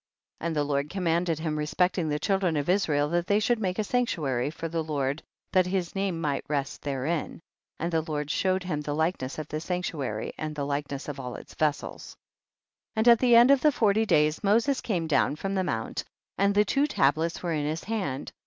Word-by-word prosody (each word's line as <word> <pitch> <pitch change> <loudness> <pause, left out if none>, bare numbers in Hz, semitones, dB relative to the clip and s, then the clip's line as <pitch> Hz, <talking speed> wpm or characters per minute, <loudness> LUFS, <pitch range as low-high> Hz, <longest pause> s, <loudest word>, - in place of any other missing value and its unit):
27. 170 - -2
And 165 - -2
the 150 - +2
Lord 145 0 -1
commanded 170 -2 0
him 155 -1 -2
respecting 175 +2 +1
the 150 - 0
children 185 -1 +1
of 145 +3 -2
Israel 155 -7 +2
that 175 +1 0
they 205 +1 +3
should 235 +2 +1
make 185 -3 -1
a 215 - +1
sanctuary 155 - 0
for 165 +1 -5
the 165 0 -2
Lord, 145 -1 -2 0.3
that 185 -2 +3
his 180 -2 -1
name 195 -4 -1
might 145 -4 -1
rest 140 -2 -2
therein, 145 +3 -2 0.4
and 170 +2 -2
the 160 - +3
Lord 150 -2 -3
showed 185 0 +1
him 160 -5 -2
the 145 0 -3
likeness 160 -4 -1
of 155 -1 -5
the 155 - -3
sanctuary 155 - -3
and 155 -1 -4
the 145 -1 -2
likeness 140 -1 -3
of 145 -2 -5
all 125 -2 -5
its - - -11
vessels. 150 -2 -2 0.8
28. - - -1
And 220 - +2
at 230 - -1
the 245 -2 +5
end 240 +3 +8
of 280 -2 +5
the 305 - +5
forty 220 -3 +2
days, 150 +3 +2
Moses 235 +7 +2
came 180 -7 -1
down 145 -2 +2
from 195 +5 -3
the 190 -1 +1
mount 115 -10 -3 0.3
and 200 +1 +2
the 210 0 +5
two 275 +8 +2
tablets 160 - +1
were 170 -2 -1
in 150 -1 -1
his 155 +2 -3
hand. 190 -12 -3
165 Hz, 215 wpm, -27 LUFS, 145-195 Hz, 0.8 s, end